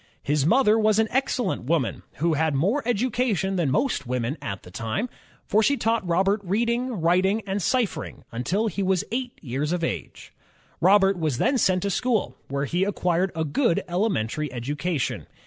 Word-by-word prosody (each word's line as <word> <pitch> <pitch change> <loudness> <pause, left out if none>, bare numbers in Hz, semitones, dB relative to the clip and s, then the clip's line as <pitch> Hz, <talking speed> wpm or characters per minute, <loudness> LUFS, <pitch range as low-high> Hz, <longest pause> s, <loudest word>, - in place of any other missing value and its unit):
His 145 0 +1
mother 225 0 +4
was 215 -1 +3
an 220 0 +3
excellent 250 - 0
woman 150 -4 0
who 165 +2 0
had 155 -1 +1
more 200 - +1
education 235 -5 0
than 170 -6 +1
most 145 - 0
women 125 +2 -1
of 100 -1 -4
the 90 - -13
time, 115 - -3 0.4
for 215 - +3
she 280 +6 +2
taught 225 -2 +1
Robert 195 +4 +2
reading, 235 +4 0
writ 175 +3 +3
ing, 205 +3 +1
and 200 +1 -2
ciphering, 240 +4 -1
until 175 - -1
he 205 -2 -2
was 190 0 +1
eight 245 +1 -3
years 140 +3 -2
of 175 -1 -1
age. - - -5 0.5
Robert 195 +1 +4
was 155 -6 0
then 275 - +2
sent 185 -3 +2
to 200 - 0
school, 220 - 0
where 140 +1 -2
he 175 +6 0
acquired 180 -2 0
a 160 -1 -1
good 170 - +1
elementary 155 - -1
education. 145 +4 -2
185 Hz, 175 wpm, -25 LUFS, 150-220 Hz, 0.5 s, mother